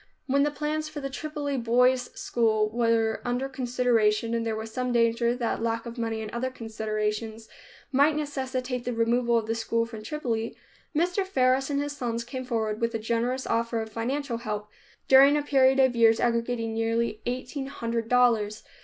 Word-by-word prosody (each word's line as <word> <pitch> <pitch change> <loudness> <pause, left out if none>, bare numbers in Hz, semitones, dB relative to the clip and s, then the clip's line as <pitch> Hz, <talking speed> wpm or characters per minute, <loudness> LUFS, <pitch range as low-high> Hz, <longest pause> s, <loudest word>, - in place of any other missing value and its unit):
When 280 +1 +2
the 295 - +3
plans 305 +1 -3
for 310 -1 -6
the 275 -1 -5
Tripoli 290 -1 -3
Boys' 250 +1 +3
School 220 -2 +1
were 230 -1 +1
under 245 +2 -1
consideration 240 -4 +1
and 230 0 0
there 225 -1 -1
was 220 0 -6
some 250 0 -1
danger 235 0 +2
that 235 -2 -2
lack 230 0 -1
of 235 +1 -7
money 225 -1 -2
and 215 - -7
other 245 +2 -2
considerations 220 -1 -3 0.4
might 285 +3 +4
necessitate 260 -4 -3
the 245 - -2
removal 235 +1 +2
of 225 - -1
the 225 - -1
school 230 0 0
from 225 -2 -9
Tripoli, 230 -4 -3 0.4
Mr. 355 +5 +1
Faris 265 -7 +2
and 280 -1 0
his 290 0 -3
sons 235 -3 -2
came 255 +2 -6
forward 220 -3 -2
with 230 0 0
a - - +2
generous 235 +4 -1
offer 230 0 0
of 220 0 -5
financial 245 +3 -2
help, 210 -2 -4 0.4
during 275 +2 +7
a 295 - -1
period 270 -2 +4
of 260 -2 +4
years 225 -1 +5
aggregating 235 -1 0
nearly 225 0 -1
eighteen 255 +2 -3
hundred 230 -4 -3
dollars. 225 -4 +2
235 Hz, 180 wpm, -27 LUFS, 225-260 Hz, 0.4 s, during